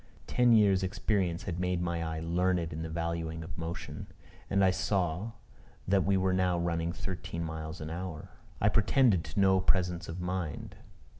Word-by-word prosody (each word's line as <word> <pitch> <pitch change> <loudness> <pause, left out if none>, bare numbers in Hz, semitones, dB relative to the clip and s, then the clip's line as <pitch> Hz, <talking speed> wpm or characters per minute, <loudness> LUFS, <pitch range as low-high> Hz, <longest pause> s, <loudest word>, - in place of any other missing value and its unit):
Ten 125 -1 +3
years' 100 -4 +5
experience 95 -1 0
had 90 -2 -4
made 90 -1 0
my 85 -1 -1
eye 80 -1 -3
learned 85 0 0
in 80 - -4
the 80 - -4
valuing 80 0 -3
of 80 -1 -8
motion; 80 +1 -6 0.4
and 100 0 +3
I 95 - +5
saw 95 +2 -1 0.5
that 95 0 +3
we 100 0 +3
were 95 0 +2
now 90 -1 +2
running 85 -1 -1
thirteen 90 -2 -5
miles 80 0 -5
an 75 0 -5
hour. 85 -2 -6 0.3
I 100 - +3
pretend 110 -3 +3
to - - -4
no 95 -1 +5
presence 90 -2 +1
of 85 +3 -5
mind. 90 -3 -4
90 Hz, 170 wpm, -31 LUFS, 85-95 Hz, 0.5 s, years